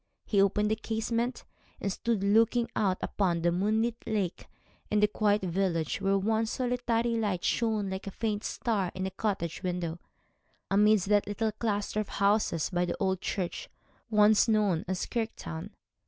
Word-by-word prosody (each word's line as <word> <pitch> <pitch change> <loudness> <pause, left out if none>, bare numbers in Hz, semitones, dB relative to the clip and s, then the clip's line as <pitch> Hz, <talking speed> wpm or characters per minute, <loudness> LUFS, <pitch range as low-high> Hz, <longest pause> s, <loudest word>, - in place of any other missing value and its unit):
He 200 -3 +3
opened 210 +2 +2
the - - +3
casement, 230 +2 -2 0.3
and 200 - -2
stood 230 -2 -1
looking 225 +3 +3
out 190 -3 +1
upon 175 -4 0
the 175 - +3
moonlit 220 +6 +1
lake 200 -5 -2 0.4
and 210 - +2
the - - +7
quiet 210 -1 +1
village, 175 -2 -1
where 195 0 +2
one 220 +3 +1
solitary 240 -1 0
light 200 -5 -1
shone 215 -4 0
like 190 +1 -5
a - - -1
faint 215 +1 -2
star 205 -6 -1
in 185 0 -2
a 190 - -3
cottage 190 -5 -2
window, 175 -2 -3 0.7
amidst 210 -1 +4
that 205 -1 +3
little 215 +2 -1
cluster 210 -1 -2
of 215 - -3
houses 200 -5 +1
by 175 -1 +1
the 175 - -3
old 190 -2 0
church, 180 -3 -3 0.4
once 210 +1 +5
known 210 -7 +2
as 185 0 -2
Kirktown. 220 - -4
205 Hz, 160 wpm, -29 LUFS, 190-220 Hz, 0.7 s, the